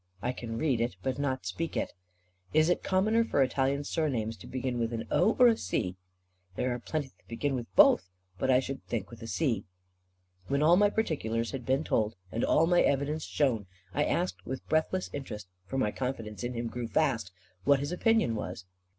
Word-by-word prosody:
"I 120 +6 -1
can 115 -2 -5
read 130 -4 +1
it, 120 +1 -1
but 130 0 -1
not 130 -2 -1
speak 165 0 -3
it." - - -2 0.6
"Is 155 +2 +5
it 175 - +2
commoner 215 +5 +2
for 145 -11 +2
Italian 135 +2 0
surnames 125 -8 -1
to - - -12
begin 130 -1 -2
with 115 0 -1
an 115 -1 -3
O, 220 - +4
or 250 - +7
with 230 -2 +6
a - - -9
C?" 90 0 -1 0.6
"There 125 +4 0
are 120 - -4
plenty 140 +2 -3 0.2
beginning 130 +4 -1
with 115 -6 -8
both; 90 +1 +6 0.3
but 130 - 0
more 130 - +6
I - - +3
should 135 +1 -5
think 110 -3 -3
with 120 - -11
a 115 - -6
C." 130 -3 0 0.8
When 140 +2 +1
all 165 +3 +7
my 205 +2 +5
particulars 115 - -1
had 130 -4 -6
been 135 +3 +2
told, 110 -6 0 0.2
and 115 - -1
all 160 - +4
my 175 +1 +4
evidence 145 +3 +1
shown, 120 -9 0 0.3
I - - +2
asked 90 0 -1
with 130 +2 -6
breathless 160 +4 0
interest 105 -9 -6 0.2
for 135 - -3
my 105 -5 +1
confidence 115 -4 -4
in 120 0 -3
him 115 0 -2
grew 120 0 -4
fast 115 -8 +1 0.3
what 140 -1 +5
his 145 +3 -3
opinion 220 - +2
was. 90 -3 -5
130 Hz, 205 wpm, -30 LUFS, 115-155 Hz, 0.8 s, or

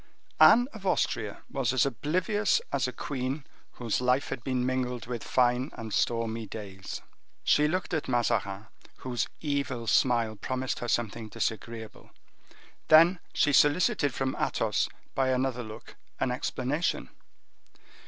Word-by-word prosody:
Anne 245 +2 +8
of 215 -3 -10
Austria 115 - -1
was 135 -4 -1
as 130 0 +3
oblivious 180 - +1
as 135 -2 +1
a - - -3
queen 135 +2 -4 0.3
whose 120 -1 -2
life 125 +2 +2
had 120 - -5
been 125 -1 0
mingled 125 -1 -1
with 120 -1 -5
fine 125 +1 +2
and 110 -2 -7
stormy 115 -1 0
days. 95 -3 -7 0.4
She 150 0 +4
looked 185 +3 -2
at 155 - -1
Mazarin, 110 -5 0 0.3
whose 125 -2 -2
evil 140 -5 -2
smile 115 -1 +2
promised 130 +5 -3
her 120 - -4
something 115 -1 -1
disagreeable; 115 0 -4 0.8
then 165 +3 +7
she 145 - +2
solicited 145 - +4
from 130 +1 -2
Athos, - - 0 0.2
by 135 -1 +1
another 130 -1 0
look, 110 -2 -10 0.2
an 130 - +1
explanation. 130 +5 -1
125 Hz, 135 wpm, -29 LUFS, 115-140 Hz, 0.8 s, Anne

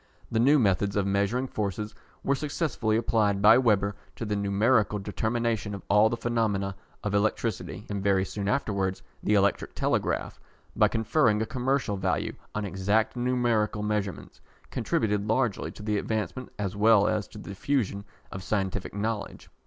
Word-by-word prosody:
The 110 - +1
new 140 +6 +5
methods 100 -4 +2
of 100 -2 +1
measuring 100 +6 +1
forces 105 -2 -3 0.3
were 140 - +2
successfully 140 -6 -1
applied 105 -3 +1
by 105 +4 +7
Weber 105 -5 +2 0.2
to 115 - -5
the 105 -1 -1
numerical 105 +2 +2
determination 110 +1 -1
of 100 - -9
all 105 +2 +6
the 120 - -2
phenomena 105 -5 0 0.3
of 105 - -2
electricity, 105 0 -1
and 100 -1 -3
very 95 -1 +2
soon 100 -1 -4
afterwards 100 - -1 0.2
the 105 - +2
electric 100 0 +1
telegraph, - - -1 0.4
by - - +5
conferring 110 0 +2
a 110 - 0
commercial 125 -4 -1
value 95 -1 -1 0.2
on 105 -1 -1
exact 100 +4 0
numerical 120 -4 +1
measurements, 105 -3 -3 0.3
contributed 105 -1 0
largely 110 -2 0
to 105 - -11
the 105 -1 0
advancement, 110 +4 -3
as 100 -1 -3
well 105 -1 +5
as 105 -2 0
to - - -13
the 105 - -9
diffusion 100 -1 -1 0.3
of 95 - -6
scientific 95 0 -2
knowledge. 105 0 -4
105 Hz, 155 wpm, -27 LUFS, 100-115 Hz, 0.4 s, by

